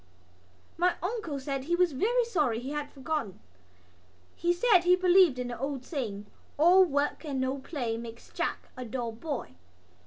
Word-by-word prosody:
My 360 +1 +2
uncle 360 -8 -3
said 270 0 -4
he 345 +3 +1
was 360 -1 +3
very 465 - +1
sorry 300 - +1
he 260 +3 -6
had 295 -1 -4
forgotten. 275 - -4 1.0
He 345 +1 +1
said 370 +2 +5
he 355 +1 +4
believed 365 -5 +5
in 250 -1 -3
the 240 - -6
old 270 -1 -3
saying: 220 - -4 0.3
"All 355 +5 +7
work 290 -3 0
and 280 -4 -3
no 260 +1 -1
play 245 -6 -3
makes 230 0 -9
Jack - - -3
a 255 - -6
dull 240 0 -3
boy." 270 +5 -5
285 Hz, 165 wpm, -29 LUFS, 255-350 Hz, 1.0 s, All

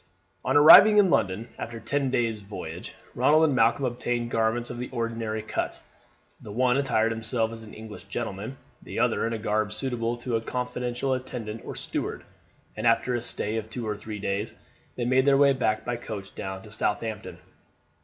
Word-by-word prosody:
On - - +3
arriving 200 +8 +10
in 195 -4 +5
London, 95 +5 +1
after 115 0 -5
ten 140 +2 -1
days' 115 -4 0
voyage, 90 -5 -8 0.2
Ronald 155 +2 +4
and 155 -3 +3
Malcolm 130 +2 +3
obtained 120 -1 -2
garments 115 +2 0
of 120 - -6
the 125 - -4
ordinary 115 -2 -3
cut. - - -3 0.6
The 105 - -9
one 125 +3 +2
attired 115 -5 +2
himself 115 0 -1
as 115 0 -8
an 105 - -12
English 110 -2 -10
gentleman, 110 +4 -5 0.2
the - - -8
other - - +1
in 115 - -2
a - - -1
garb 105 -1 0
suitable 120 -1 -1
to 120 -1 -1
a - - -4
confidential 125 +2 -2
attendant 120 -4 -5
or - - -6
steward, - - -3 0.5
and 110 +2 -1
after 115 +2 +3
a 120 - -1
stay 110 -2 -2
of 110 0 -5
two 115 -1 -5
or 105 - -1
three 105 +1 -7
days 100 +1 -3 0.4
they 120 - -1
made 130 +2 +3
their 140 -1 +5
way 140 0 +5
by 110 -5 +1 0.2
coach 105 -5 -7
down 95 0 -6
to 105 - -13
Southampton. 105 0 -3
115 Hz, 185 wpm, -26 LUFS, 110-125 Hz, 0.6 s, arriving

